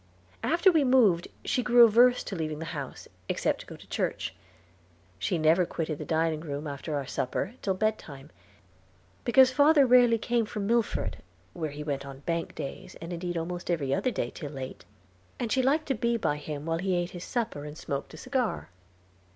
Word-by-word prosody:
After 340 +3 +4
we 315 -4 +3
moved 235 -10 +4 0.2
she 255 - +1
grew 240 -1 +7
averse 245 +3 +5
to 195 - -5
leaving 155 -3 -3
the 165 - -5
house, 140 -4 -6 0.2
except - - 0
to - - -14
go - - -9
to - - -15
church. - - -2 0.9
She 175 - 0
never 160 +3 +4
quitted 160 -3 -3
the - - -5
dining 160 -1 +1
room 145 -1 -5
after 145 +1 -4
our 140 -1 -2
supper 130 - -2
till 190 -2 0
bedtime, 165 -9 -3 0.9
because 260 +1 +6
father 285 +1 +5
rarely 245 -2 +6
came 230 0 0
from 210 -2 -4
Milford, 235 +1 0 0.4
where 160 -3 -3
he 145 +1 -7
went 140 -2 -3
on 135 -1 -10
bank 165 +2 -3
days, 135 - -7
and 165 +2 -6
indeed 175 0 -3
almost 175 +2 -4
every 145 -6 0
other 255 - +1
day, - - -2
till 150 - -7
late, 135 -2 -7 0.5
and 235 -3 -2
she 260 - +3
liked 295 +5 +2
to - - +3
be 235 0 0
by 150 -9 0
him 150 0 -6
while 165 0 -1
he 190 0 0
ate 175 0 -1
his 175 -1 -7
supper 230 -12 -3
and 150 +1 -8
smoked 140 -3 -4
a - - -11
cigar. 255 -3 -2
175 Hz, 190 wpm, -28 LUFS, 150-240 Hz, 0.9 s, grew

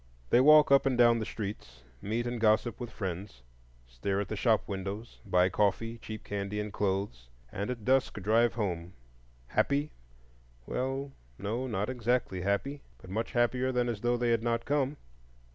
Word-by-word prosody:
They 120 - +6
walk 150 +1 +7
up 140 0 +6
and 130 -2 +1
down 120 -1 +5
the 110 - -3
streets, 95 - -6 0.2
meet 115 +4 -2
and 120 -1 -3
gossip 110 +1 +2
with 120 -2 -5
friends, 95 - -6 0.4
stare 65 +12 -2
at 100 - -3
the 110 - -2
shop 110 +1 +2
windows, 100 +3 -5
buy 90 -1 +4
coffee, 105 +4 0
cheap 110 -1 -8
candy, 100 +1 -3
and 105 -1 -4
clothes, 95 -12 -2 0.2
and 100 +4 -3
at 120 -4 -5
dusk 130 0 +2
drive 115 +3 +3
home—happy? 85 - -3 0.7
well 135 +2 -3 0.3
no, 115 +6 -3
not 105 -4 -1
exactly 120 -6 -1
happy, 100 +10 -1 0.2
but 90 +9 -13
much 110 +3 -2
happier 125 +2 +2
than 125 -1 +1
as 115 -4 -3
though 120 0 +1
they 120 0 +1
had 115 -1 +2
not 115 0 -1
come. 145 0 0
110 Hz, 165 wpm, -30 LUFS, 100-120 Hz, 0.7 s, walk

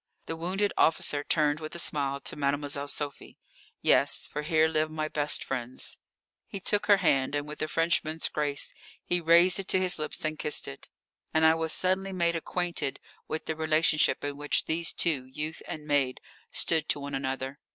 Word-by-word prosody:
The 165 - -4
wounded 190 +5 -1
officer 150 -2 +2
turned 150 -1 +1
with 155 +1 -7
a - - -4
smile 140 -4 0
to - - -2
Mademoiselle 145 0 0
Sophie. 145 0 -4 0.5
"Yes, - - +4
for 150 - -4
here 155 +1 +3
live 155 -1 0
my 155 0 -3
best 150 -1 -1
friends." 125 -1 -4 0.5
He 200 - -6
took 205 +2 0
her 205 -1 +7
hand, 140 -6 +1
and 145 0 -2
with 150 - -8
a 155 - 0
Frenchman's 160 -1 +1
grace 145 -2 -1 0.3
he 175 0 0
raised 170 +3 +5
it 195 - -5
to 185 - +3
his 185 -3 +1
lips 155 +1 -5
and 155 0 -3
kissed 150 - +3
it. 70 - -9 0.5
And 160 0 +4
I 160 - +7
was 160 -1 -1
suddenly 190 +2 +1
made 170 -2 +1
acquainted 170 -3 -2 0.3
with 155 - -3
the 160 - -2
relationship 155 0 +2
in 145 0 -3
which 145 0 0
these 165 +1 0
two, 150 -7 +1
youth 155 +4 -5
and 150 -1 -7
maid, 140 -3 +1 0.3
stood 160 -2 +1
to - - +1
one 140 0 -6
another. 135 +1 -3
155 Hz, 185 wpm, -28 LUFS, 145-165 Hz, 0.5 s, her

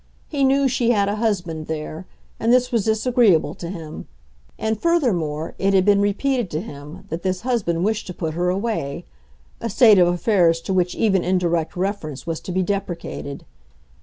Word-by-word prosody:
He 285 -3 -1
knew 270 +1 +4
she 240 -2 +1
had 205 -4 +3
a 205 - -2
husband 180 -8 -2
there, 155 +2 -5 0.3
and 230 - +2
this 250 0 +3
was 230 -5 +1
disagreeable 220 - +3
to 170 - -7
him; 160 -4 -8 0.5
and, 220 -1 -2
furthermore, 180 - 0
it 195 0 +2
had 185 -1 +4
been 200 -1 +4
repeated 230 +2 0
to 155 - -2
him 145 -6 -10
that 165 +2 -4
this 185 0 -2
husband 210 -9 0
wished 220 +1 -1
to 180 - -5
put 160 -3 -3
her 175 +2 0
away—a 140 - -5
state 215 -2 +6
of 175 - +6
affairs 175 -2 +2
to 190 - -3
which 180 -1 +1
even 195 -5 +2
indirect 170 -3 0
reference 180 -7 -3
was 165 -1 -3
to - - -7
be 185 +1 +1
deprecated. 175 -7 -4
185 Hz, 175 wpm, -22 LUFS, 165-220 Hz, 0.5 s, state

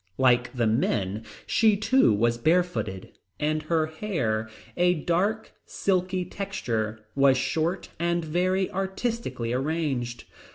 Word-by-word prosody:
Like 125 -2 +3
the 120 -3 0
men, 110 -2 0 0.2
she 220 -2 +3
too 255 - +4
was 115 +3 +1
bare 170 +8 +4
footed, 100 - -5 0.3
and 155 +1 0
her 155 0 +1
hair, 155 - -2 0.3
a 180 0 +3
dark 190 +8 0 0.2
silky 185 -1 0
texture, 110 - -3
was 135 -1 +4
short 155 +7 -1
and 170 0 0
very 185 +4 0
artistically 195 - -2
arranged. 135 -4 -2
155 Hz, 120 wpm, -26 LUFS, 120-185 Hz, 0.3 s, too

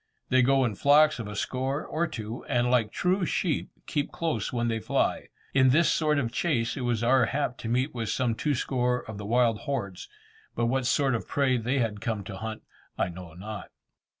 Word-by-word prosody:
They 130 0 +5
go 135 +1 +4
in 115 - -1
flocks 150 +6 +4
of 110 - -4
a 105 - -6
score, 130 +6 -2
or 170 +2 -1
two, 115 -6 -6
and 120 0 +1
like 115 -4 +2
true 185 +6 +1
sheep, 170 -2 -1 0.2
keep 145 -3 -2
close 165 -2 -2
when 120 -2 0
they 115 -1 0
fly. - - 0 0.3
In 130 -1 +5
this 155 +6 +4
sort 155 -2 +2
of 120 -5 0
chase 120 -9 0
it 135 - -4
was 120 -2 0
our 125 0 +4
hap 140 -2 -2
to 115 - -5
meet 130 +5 0
with 115 -3 -3
some 125 0 +1
two 145 +5 0
score 125 -1 0
of 110 -2 -7
the 100 - -6
wild 115 -1 +3
hordes, 100 -10 -4 0.5
but 120 - +1
what 130 +1 0
sort 135 +1 +2
of 115 - -3
prey 135 -3 +2
they 125 +3 0
had 110 -5 -1
come 110 -3 -2
to 95 0 -7
hunt 110 +2 -6 0.3
I - - 0
know 85 -2 -10
not. 105 +3 -7
125 Hz, 210 wpm, -27 LUFS, 110-140 Hz, 0.5 s, They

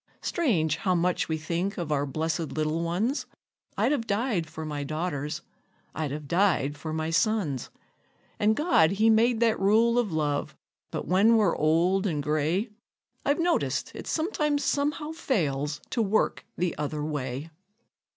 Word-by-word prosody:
Strange 175 - +1
how 185 -4 +1
much 175 0 +1
we 160 - 0
think 170 +6 -2
of 170 -4 -3
our 145 -1 +1
blessed 160 +3 -2
little 155 +1 -1
ones! 195 - -1 0.5
I'd - - +2
have 240 -6 -1
died 200 -5 0
for 160 0 -6
my 145 -2 -3
daughters, 155 0 -3 0.5
I'd 155 -2 -2
have 145 +1 -6
died 170 -5 +2
for 155 +2 -6
my 160 +1 -2
sons; 180 - 0 0.7
And 215 +1 +3
God 255 - +3
he 220 +3 +4
made 230 +1 +3
that 230 -2 +3
rule 225 +5 +4
of 225 -6 0
love; 150 -2 -1 0.3
but - - -5
when 210 +6 +5
we're 205 -6 +3
old 175 +6 +2
and 150 -5 -1
gray, 155 - 0 0.5
I've 285 - +2
noticed 340 0 0
it - - -8
sometimes 300 -4 0
somehow 295 +2 0
fails 150 - -1
to 235 - +1
work 215 0 0
the 175 -1 0
other 150 0 -2
way. 145 0 -4
175 Hz, 155 wpm, -27 LUFS, 155-225 Hz, 0.7 s, when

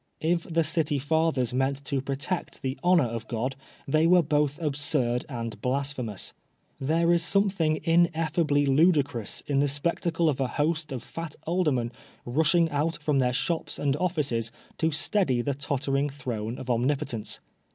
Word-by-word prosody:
If 170 +1 +1
the 165 0 +3
City 155 -2 0
Fathers 145 -3 +1
meant 135 +2 0
to 135 0 -1
protect 140 +5 -3
the 130 0 -1
honor 175 -3 +5
of 115 -1 -5
God, 125 +3 -2 0.3
they 155 +4 +3
were 180 0 +6
both 145 -1 +1
absurd 140 -5 0
and 115 -4 -5
blasphemous. 130 -5 -2 0.5
There 165 +5 +2
is 170 - +3
something 190 -5 +2
ineffably 165 -3 +2
ludicrous 140 - +2
in 140 -2 +1
the 145 - +3
spectacle 165 +3 0
oi 150 - +2
a - - 0
host 155 +2 -1
of 125 -3 -4
fat 165 -2 -7
aldermen 150 -9 +1 0.3
rushing 160 +6 +3
out 150 +3 0
from 145 -3 +1
their 125 -1 +2
shops 160 +7 -2
and 140 -1 +1
offices 145 -10 -1 0.3
to 160 - +2
steady 150 -5 +1
the 140 - 0
tottering 140 0 -1
throne 120 -5 -4
of 130 - -8
Omnipotence. 125 -1 -1
145 Hz, 150 wpm, -27 LUFS, 130-165 Hz, 0.5 s, were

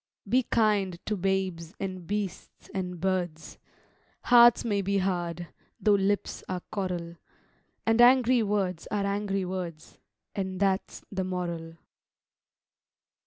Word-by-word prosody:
Be 250 +6 +4
kind 210 -6 +1
to 215 - -1
babes 190 -2 -2
and 185 -3 -5
beasts 205 -3 -5
and 180 -3 -3
birds: 175 -3 -2 0.6
Hearts 240 -1 +7
may 205 -3 +1
be 200 +1 0
hard, 175 -3 -2 0.3
though 210 - +4
lips 200 0 0
are 185 -1 -2
coral; 175 -4 -3 0.7
And 225 +1 +4
angry 250 0 +6
words 195 -5 -1
are 205 -1 -1
angry 200 -1 -1
words: 180 -4 -6 0.3
And 190 -2 -3
that's 195 -1 0
the 190 -1 -2
moral. 170 -3 -4
190 Hz, 120 wpm, -28 LUFS, 180-205 Hz, 0.7 s, Hearts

